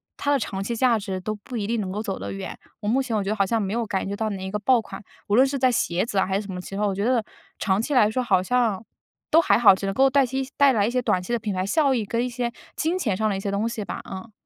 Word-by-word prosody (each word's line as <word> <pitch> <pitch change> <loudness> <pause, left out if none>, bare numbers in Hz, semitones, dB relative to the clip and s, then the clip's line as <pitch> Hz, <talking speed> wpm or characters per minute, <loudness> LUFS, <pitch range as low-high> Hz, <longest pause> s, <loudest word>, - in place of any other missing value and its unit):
它 285 - -1
的 285 - +3
长 195 -4 -3
期 235 - -3
价 235 0 +3
值 195 -3 -4
都 215 +3 -4
不 225 +4 -8
一 205 -2 -2
定 230 0 0
能 190 -2 -4
够 205 +3 -3
走 200 -3 -3
得 - - -6
远。 195 -1 -6 0.2
我 210 - -5
目 265 +5 +2
前 235 -4 -1
我 - - 0
觉 195 - -3
得 215 - 0
好 200 -2 +2
像 225 +3 0
没 195 0 -2
有 235 0 -1
感 195 -3 -2
觉 200 - -3
到 220 +1 -1
哪 195 -2 -5
一 190 - -4
个 210 - -2
爆 245 +3 +3
款， 195 -2 -10 0.2
无 205 - +2
论 255 +3 +6
是 275 0 -2
在 255 0 +4
鞋 185 -6 0
子 205 - -4
啊 190 - +3
还 195 +1 0
是 205 - -7
什 190 - -6
么 180 - -5
其 195 - -10
它， 210 0 +1
我 195 - -1
觉 200 - -2
得 245 +1 +2 0.4
长 195 0 +1
期 285 - -2
来 230 -5 +5
说 255 +2 -1
好 190 -6 +3
像 225 -2 +1 0.5
都 325 - +7
还 - - +3
好， 225 -4 +7
只 195 - -5
能 195 - -1
够 270 +1 +5
带 280 -1 +4
些 265 +2 -2 0.2
带 280 -1 +6
来 205 -4 +2
一 - - -1
些 250 0 +1
短 185 -6 +1
期 180 +6 -4
的 235 - +1
品 210 -1 -3
牌 185 0 -1
效 280 +6 +2
益 225 -4 -1
跟 230 +4 -1
一 - - -3
些 240 0 -2 0.2
金 330 +3 0
钱 225 - 0
上 220 - +1
的 200 - -1
一 - - -4
些 200 +1 -3
东 200 +3 0
西 230 -2 -4
吧， - - -6
嗯。 195 +4 -8
215 Hz, 360 characters per minute, -24 LUFS, 195-245 Hz, 0.5 s, 都